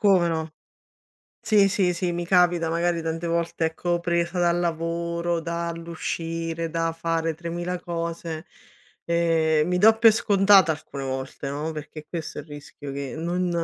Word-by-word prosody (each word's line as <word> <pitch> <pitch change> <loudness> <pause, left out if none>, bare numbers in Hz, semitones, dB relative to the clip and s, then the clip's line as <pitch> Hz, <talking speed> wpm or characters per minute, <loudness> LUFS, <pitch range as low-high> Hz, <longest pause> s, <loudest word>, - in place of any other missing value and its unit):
Come 190 -5 +4
no. 160 -1 -2 0.9
Sì, 210 -2 +4
sì, 190 -3 +2
sì, 175 0 -1
mi 175 0 -3
capita, 175 -2 +3
magari, 170 +1 0
tante 165 +1 -3
volte, 170 0 0
ecco, 175 +2 -1
presa 170 +1 0
dal 175 0 +2
lavoro, 170 0 -1
dall'uscire, 165 0 -3
da 165 0 0
fare 165 0 -1
3000 175 +2 -4
cose, 165 -1 -4 0.6
ehm, 165 -2 +2
mi 180 0 +1
do 220 +4 +6
pe 225 0 +7
scontata 200 -5 +5
alcune 145 -2 -8
volte, 135 +1 -4
no, 150 +3 -3
perché 155 0 -8
questo 165 -4 -5
è - - -4
il 145 - -17
rischio 145 -1 -9
che 140 -3 -5
non 175 +2 -1
170 Hz, 150 wpm, -25 LUFS, 160-175 Hz, 0.9 s, pe